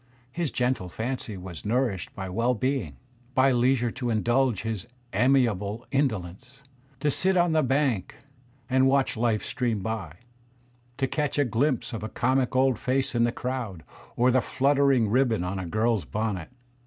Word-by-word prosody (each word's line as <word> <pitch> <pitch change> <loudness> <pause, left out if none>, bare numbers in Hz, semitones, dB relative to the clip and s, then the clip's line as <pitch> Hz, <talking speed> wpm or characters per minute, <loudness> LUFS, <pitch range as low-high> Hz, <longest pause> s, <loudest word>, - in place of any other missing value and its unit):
His 170 +2 -2
gentle 125 -8 -1
fancy 110 0 -4
was 90 -3 -8
nourished 110 -4 -1
by 95 -1 -5
well 115 +7 +1
being, 120 - -2 0.4
by 130 +1 +5
leisure 120 -1 +2
to 125 0 -3
indulge 120 0 +1
his 110 -2 -4 0.3
amiable 115 -2 +2
indolence, 125 -1 -2 0.4
to 150 - +2
sit 190 +6 +2
on 175 -1 +3
the 160 -1 +3
bank 130 -7 0 0.5
and 130 +1 +3
watch 135 0 +2
life 115 -2 0
stream 115 -5 -1
by, 105 -8 -4 0.8
to 135 - +1
catch 145 +3 -1
a 145 - +3
glimpse 125 +2 0
of 115 - -4
a 110 - -4
comic 130 +2 0
old 130 -3 +3
face 130 0 0
in 120 -1 +3
the 120 - +1
crowd 120 - -4 0.3
or 125 +2 +3
the 130 0 +3
fluttering 135 -2 +2
ribbon 115 -3 +2
on 95 +2 -3
a 90 - -4
girl's 110 +2 +1
bonnet. 105 -6 -3
120 Hz, 160 wpm, -26 LUFS, 110-135 Hz, 0.8 s, by